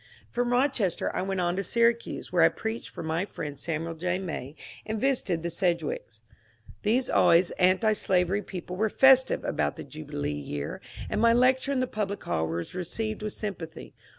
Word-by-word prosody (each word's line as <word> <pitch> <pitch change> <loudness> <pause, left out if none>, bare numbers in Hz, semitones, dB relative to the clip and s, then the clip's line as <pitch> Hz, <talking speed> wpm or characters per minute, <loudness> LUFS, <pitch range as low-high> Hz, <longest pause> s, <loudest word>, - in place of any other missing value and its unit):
From 245 0 0
Rochester 245 - +1
I - - 0
went 190 0 -1
on 175 0 +1
to 195 - 0
Syracuse, 235 +3 +1
where 175 - +4
I 165 - +7
preached 220 +1 -5
for - - -7
my 160 +2 0
friend 145 -8 -6
Samuel 165 +1 -3
J. 180 +2 -1
May, 160 -7 -5 0.3
and 220 0 -3
visited 210 -10 0
the 170 - -2
Sedgwicks. 190 - -2 0.6
These 235 +5 +2
always 170 +1 +4
antislavery 190 0 +3
people 180 -2 -7
were 215 +3 +1
festiye 265 +2 +5
about - - 0
the - - -7
jubi 155 -1 -10
lee 145 - -1
year, 75 0 -5 0.3
and 210 - -1
my 230 0 +6
lecture 255 +3 +3
in 265 -2 +1
the - - +2
public 205 -4 -3
hall 80 0 -1
was 85 +1 -4
received 215 +5 -3
with 215 -1 -3
sympathy. 175 -6 -6
190 Hz, 180 wpm, -28 LUFS, 165-230 Hz, 0.6 s, I